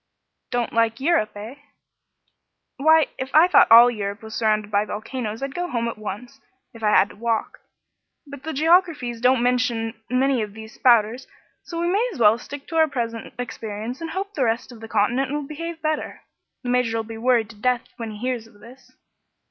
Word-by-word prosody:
"Don't 245 -2 -2
like 230 0 +1
Eu 320 +6 +2
rope, 215 -11 0
eh?" 220 +6 -8 1.2
"Why, 315 +2 +5
if 260 +2 -5
I 320 +3 +7
thought 360 - +5
all 235 +2 +9
Europe 200 -2 -5
was 220 0 -9
surrounded 215 -2 0
by 205 0 +2
volcanoes, 220 +2 -5
I'd 275 0 -4
go 355 +2 -3
home 235 -4 -1
at 235 - -4
once, 245 +5 -7 0.3
if 230 - -13
I 215 - +2
had 205 -1 +4
to - - -14
walk. 225 +1 -2 0.7
But 280 -2 -10
the 320 +3 -5
geographies 310 -6 +2
don't 250 0 +3
mention 245 -2 0 0.2
many 255 0 +2
of 210 -1 -5
these 220 0 -10
spouters, 240 +1 +3 0.3
so 335 - -6
we 345 - 0
may 445 +6 +1
as 330 - -9
well 220 0 +5
stick 280 +2 -9
out - - 0
our 320 - +5
present 230 -5 -4
experience 230 +1 -6
and 330 - -4
hope 390 +4 -4
the 270 -7 0
rest 230 +2 -1
of 235 - -12
the 225 - -8
continent 240 +6 0
will 295 0 -2
behave 325 +3 -7
better. 310 0 -3 0.4
The 245 - -4
Major'll 230 -2 +1
be 225 0 -9
worried 235 -2 +2
to - - -16
death 250 -1 +1
when 230 -2 -5
he 210 - -8
hears 245 0 -3
of 215 -2 -21
this." 240 +5 -16
245 Hz, 200 wpm, -23 LUFS, 225-275 Hz, 1.2 s, all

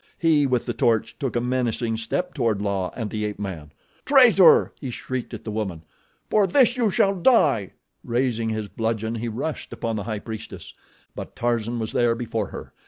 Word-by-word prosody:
He 155 -4 +3
with 125 -2 0
the - - -2
torch 115 -2 0
took 135 -5 -3
a - - +2
menacing 120 -2 -1
step 115 +11 -3
toward 115 -7 0
La 100 -3 -1
and 110 -4 -4
the 105 -1 -3
ape 105 -1 -3
man. 90 -7 -6 0.3
"Traitor!" 240 - +6
He 135 - -4
shrieked 125 0 -5
at - - -8
the 110 - -5
woman. 95 -7 -4 0.4
"For 210 -2 +3
this 250 +4 +4
you 245 -2 +1
too - - +3
shall 195 +1 +2
die!" 160 - +3 0.3
Raising 120 -2 0
his 110 -1 -3
bludgeon 110 +1 -2
he 115 +1 -3
rushed 135 +8 -4
upon 115 -1 -3
the 100 - -4
High 110 -2 -3
Priestess; 110 +1 -8 0.4
but - - -8
Tarzan 120 0 -1
was 110 -1 -3
there 120 -1 +2
before 115 -3 -3
her. - - -9
115 Hz, 190 wpm, -24 LUFS, 110-135 Hz, 0.4 s, Traitor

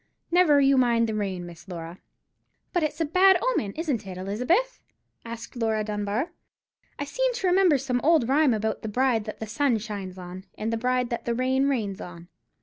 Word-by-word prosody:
Never 340 -5 +5
you 275 -1 +4
mind 235 -2 +3
the 220 - -2
rain, 195 -4 -3
Miss 175 +1 -12
Laura." 170 -1 -7 0.7
"But 350 - +2
it's 305 +1 -2
a 325 - +1
bad 370 +4 +5
omen, 470 - 0
isn't 275 - -2
it, 185 -1 -7
Elizabeth?" 250 - 0 0.4
asked 230 +1 -8
Laura 220 -2 0
Dunbar. 210 +8 -2 0.7
"I 285 - -3
seem - - 0
to 390 - -3
remember 360 -4 +4
some 250 -2 -1
old 310 -6 +4
rhyme 275 -2 +3
about 220 0 -2
the 220 - -4
bride 240 -1 +1
that 215 - -7
the 220 - -4
sun 235 +3 +1
shines 200 -4 -6
on, 180 +1 -9
and 220 +2 -2
the - - +2
bride 250 +1 0
that 235 - -3
the 235 - 0
rain 260 +2 +1
rains 210 -8 -2
on." 175 0 -10
235 Hz, 195 wpm, -26 LUFS, 205-285 Hz, 0.7 s, Never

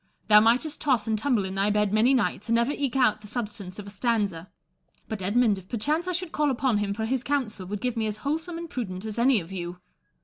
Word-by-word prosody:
Thou 210 0 +9
mightest 245 +8 +2
toss 255 -8 +2
and 220 - 0
tumble 220 -2 +1
in 190 - -5
thy 195 +1 +1
bed 210 -1 +1
many 235 +5 +4
nights, 215 -3 0
and 230 - +3
never 235 +4 +2
eke 280 -3 -2
out 250 -5 +3
the 210 - -11
substance 205 -4 -4
of 205 - -7
a 200 - -8
stanza; 200 -5 -1 0.6
but 220 -4 -5
Edmund, 205 +1 +2
if 185 - -17
perchance 300 - 0
I - - 0
should 360 -1 -3
call 300 -1 +1
upon 255 -4 +1
him 205 -1 -1
for 220 +2 -2
his 255 +2 -1
counsel, 245 -9 -2
would 205 +1 -4
give 250 -1 -1
me 225 -1 0
as 210 0 -3
wholesome 320 +4 -2
and 335 0 -6
prudent 210 - -5
as 220 +1 -3
any 245 -1 +4
of 170 0 -10
you. 175 -1 -5
220 Hz, 245 wpm, -26 LUFS, 205-260 Hz, 0.6 s, Thou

